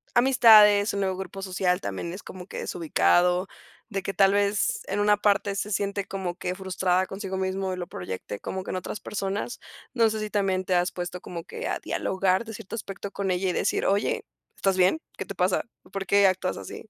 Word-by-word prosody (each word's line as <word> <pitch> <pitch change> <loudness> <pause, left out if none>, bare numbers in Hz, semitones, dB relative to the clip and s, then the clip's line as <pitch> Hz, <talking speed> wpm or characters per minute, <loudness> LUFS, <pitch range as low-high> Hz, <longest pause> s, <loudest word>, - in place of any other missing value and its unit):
amistades, 220 -5 +7
su - - -2
nuevo 190 -1 0
grupo 190 +1 -6
social 185 -1 0
también 100 - -4
es 190 - -8
como 180 -1 -9
que - - -6
desubicado, 175 - +2 0.4
de 195 -3 -2
que 195 - -4
tal 195 0 +4
vez 200 0 +1
en 200 +1 -1
una 210 0 +4
parte 205 -1 +2
se 205 +1 -3
siente 200 0 -1
como 190 -3 -4
que 180 0 -3
frustrada 185 -1 0
consigo 195 0 -5
mismo 190 0 -1
y - - -5
lo 180 - -4
proyecte, 95 +2 -6
como 190 0 -4
que - - -5
en - - -2
otras 185 +3 -5
personas, 200 +4 -3 0.3
no 230 -3 +4
sé 220 0 -3
si 215 0 -3
también 190 -2 0
te 185 - 0
has 175 0 +2
puesto 180 0 -5
como 170 -2 -7
que - - -6
a - - -1
dialogar 190 +2 0
de 225 - -7
cierto 195 - -9
aspecto 200 -2 -6
con 200 -1 -3
ella 185 +1 0
y - - 0
decir: - - 0
"Oye, 200 +2 +1 0.3
¿estás 195 -1 +1
bien?, 185 +12 +4 0.2
¿qué - - -4
te 200 - -7
pasa?, 180 +1 +1 0.3
¿por 195 0 -4
qué 200 +2 +5
actúas 185 -1 0
así?". 220 - -9
195 Hz, 215 wpm, -26 LUFS, 180-200 Hz, 0.4 s, amistades